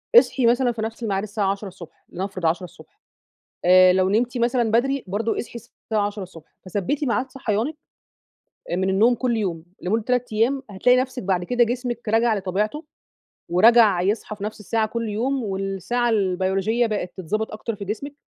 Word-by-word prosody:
اصحي 275 - +6
مثلًا 245 +1 +3
في 225 -2 -6
نفس 225 +2 -5
المعاد 195 -3 -1
الساعة 205 -2 -1
10:00ص، 190 -4 -9
لنفرض 190 -1 -5
10:00ص، 175 +2 -4 0.6
آآ 185 +1 +7
لو 185 0 +2
نمتِ 240 +5 0
مثلًا 235 -1 +1
بدري 270 +4 +1
برضه 210 +4 -1
اصحي 235 - -6
الساعة 220 -2 -3
10:00ص، 185 -6 -9
فثبتي 205 - -2
معاد 255 +2 -1
صحيانك 240 +3 -2 1.0
من 190 +2 +1
النوم 220 +6 +4
كل 240 0 -1
يوم 175 -7 -2 0.2
لمدة 220 +5 0
3 250 -1 -1
أيام، 245 +6 +1
هتلاقي 245 +6 +3
نفسِك 255 0 -2
بعد 185 -2 0
كده 245 +5 +3
جسمِك 240 -1 -4
رجع 225 +1 +3
لطبيعته 210 - -2 0.7
ورجع 210 +1 +6
يصحي 210 +2 -1
في 205 - -7
نفس 215 0 -5
الساعة 220 +2 0
كل 230 0 -3
يوم، 250 +6 -1
والساعة 195 +5 -1
البيولوجية 195 +3 +1
بقت 205 -5 -3
تتضبّط 215 +5 -3
أكتر 215 +1 -4
في 200 - -6
جسمِك، 225 +9 -5
215 Hz, 160 wpm, -23 LUFS, 190-240 Hz, 1.0 s, آآ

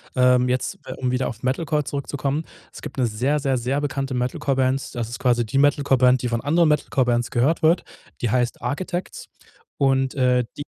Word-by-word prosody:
Ähm, 125 -1 +4
jetzt 125 0 -2 0.2
um 125 - -1
wieder 125 +1 0
auf 115 0 -10
Metalcore 150 +3 0
zurückzukommen. 140 +2 -3 0.3
Es - - -10
gibt - - -8
'ne 130 - +2
sehr, 130 +7 0
sehr, 135 -2 0
sehr 125 +4 -1
bekannte 135 -2 -3
Metalcore-Band. 130 +1 -1
Das 120 -2 -2
ist 120 - -7
quasi 120 -2 +2
die 110 +5 -2
Metalcore-Band, 135 -3 +3
die - - +1
von 115 -1 -1
anderen 165 +4 +3
Metalcore-Bands 125 -5 +1
gehört 135 +8 +1
wird. 165 +3 +4 0.4
Die 120 - 0
heißt 120 +1 0
Architects. 175 +4 -4 0.5
Und, 135 -1 +2
äh, 125 -2 +3
die 145 - -4
130 Hz, 180 wpm, -23 LUFS, 125-145 Hz, 0.5 s, Ähm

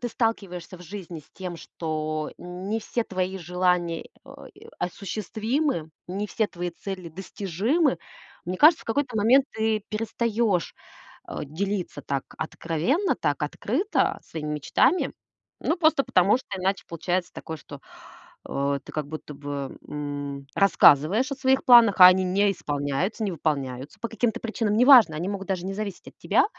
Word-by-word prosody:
ты 245 - -2
сталкиваешься 195 -7 -2
в 180 - -13
жизни 180 -2 -8
с - - -26
тем, 180 -2 -6
что 155 -2 -4
не 185 +5 -4
все 235 +2 -2
твои 185 -1 -2
желания 180 -1 0 0.2
о - - -12
е - - -15
осуществимы, 215 - -2 0.2
не 195 +4 -3
все 220 +1 0
твои 175 -2 -5
цели 185 0 -7
достижимы, 195 - -1 0.5
мне 180 +2 -3
кажется, 315 +1 +7
в - - -26
какой-то 250 0 -1
момент 250 +6 +5
ты 220 -1 0
перестаёшь, 220 - -1 0.5
э, - - -5
делиться 190 +5 -3
так 135 -1 -2
откровенно, 220 - 0
так 145 +1 -1
открыто 260 - 0
своими 150 -2 -5
мечтами. 150 - +2 0.5
Ну, 330 - 0
просто 315 -4 +3
потому, 190 +2 +3
что 260 - -15
иначе 190 +1 -1
получается 175 +2 -2
такое, 160 - -6
что, 140 - -11 0.7
э, 140 0 0
ты - - -11
как 155 -2 -3
будто 155 0 -8
бы, 140 -1 -5
м, 145 -1 -5
рассказываешь 195 - +5
о - - -1
своих 265 0 +2
планах, 230 -6 +7
а 180 - +13
они 185 +1 +5
не 195 +2 +2
исполняются, 145 +5 -2
не 200 - -1
выполняются 140 -5 -3
по 230 - -3
каким-то 225 0 -1
причинам. 220 -2 -1
Неважно, 245 - +7
они 175 +5 -3
могут 195 -1 -5
даже 185 -2 -2
не 195 - -3
зависеть 200 -2 -6
от - - -13
тебя. - - +3
185 Hz, 155 wpm, -25 LUFS, 160-225 Hz, 0.7 s, а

